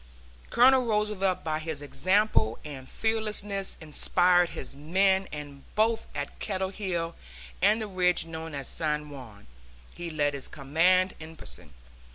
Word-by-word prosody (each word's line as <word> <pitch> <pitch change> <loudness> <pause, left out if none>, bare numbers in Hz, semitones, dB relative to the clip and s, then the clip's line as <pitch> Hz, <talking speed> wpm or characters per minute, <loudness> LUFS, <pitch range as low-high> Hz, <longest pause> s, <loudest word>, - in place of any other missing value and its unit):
Colonel 255 0 +5
Roosevelt 210 -4 0
by 155 -1 -1
his 155 -2 -5
example 185 - +2
and 135 -3 -8
fearlessness 210 -3 -1
inspired 175 +3 +3
his - - -7
men, 190 +6 +2
and 145 -2 -8
both 225 +1 +2
at 145 0 -5
Kettle 190 -2 -2
Hill 180 -4 -3 0.5
and 210 +4 +4
the 220 - -2
ridge 180 -3 +2
known 160 -1 -6
as 140 -2 -3
San 150 -1 -1
Juan 115 -7 -11 0.5
he 175 -1 -6
led 145 -2 0
his 140 -1 -3
command 165 +6 +2
in 160 +1 -9
person. 60 - -6
175 Hz, 140 wpm, -28 LUFS, 150-195 Hz, 0.5 s, Colonel